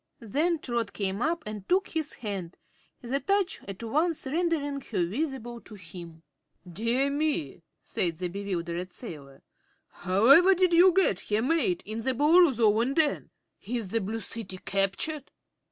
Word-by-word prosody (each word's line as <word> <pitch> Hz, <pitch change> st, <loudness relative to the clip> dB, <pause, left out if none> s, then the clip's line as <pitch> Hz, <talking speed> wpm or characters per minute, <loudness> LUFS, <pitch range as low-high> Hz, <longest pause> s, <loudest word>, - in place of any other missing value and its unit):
Then 310 Hz, -, +1 dB
Trot 235 Hz, -7 st, -3 dB
came 195 Hz, +1 st, -2 dB
up 325 Hz, +3 st, 0 dB
and 210 Hz, -2 st, -7 dB
took 380 Hz, +2 st, +2 dB
his 315 Hz, -2 st, -3 dB
hand, 195 Hz, -6 st, -6 dB, 0.5 s
the 260 Hz, +3 st, -1 dB
touch 390 Hz, +6 st, 0 dB
at 195 Hz, +3 st, -7 dB
once 305 Hz, +8 st, 0 dB
rendering 290 Hz, -2 st, -1 dB
her 195 Hz, -9 st, -1 dB
visible 240 Hz, -, -4 dB
to 215 Hz, -, -13 dB
him. 170 Hz, -3 st, -11 dB, 0.4 s
"Dear 230 Hz, +10 st, 0 dB
me!" 285 Hz, -, -1 dB, 0.2 s
said 170 Hz, -3 st, -2 dB
the 180 Hz, +1 st, -2 dB
bewildered 180 Hz, -2 st, -4 dB
sailor; 145 Hz, -, -10 dB, 0.5 s
"however 265 Hz, -, +5 dB
did 365 Hz, -1 st, +2 dB
you 355 Hz, +2 st, +7 dB
get 360 Hz, -, +3 dB
here, 210 Hz, +2 st, -1 dB
mate, 335 Hz, +5 st, +1 dB
in 220 Hz, +2 st, -5 dB
the 260 Hz, +2 st, -1 dB
Boolooroo's 300 Hz, -1 st, +5 dB
own 230 Hz, +4 st, +3 dB
den? 310 Hz, -3 st, +1 dB, 0.3 s
Is 225 Hz, -2 st, -4 dB
the 230 Hz, +3 st, 0 dB
Blue 220 Hz, +4 st, -4 dB
City 200 Hz, -2 st, -5 dB
captured?" 195 Hz, +11 st, -2 dB
235 Hz, 150 wpm, -28 LUFS, 195-310 Hz, 0.5 s, you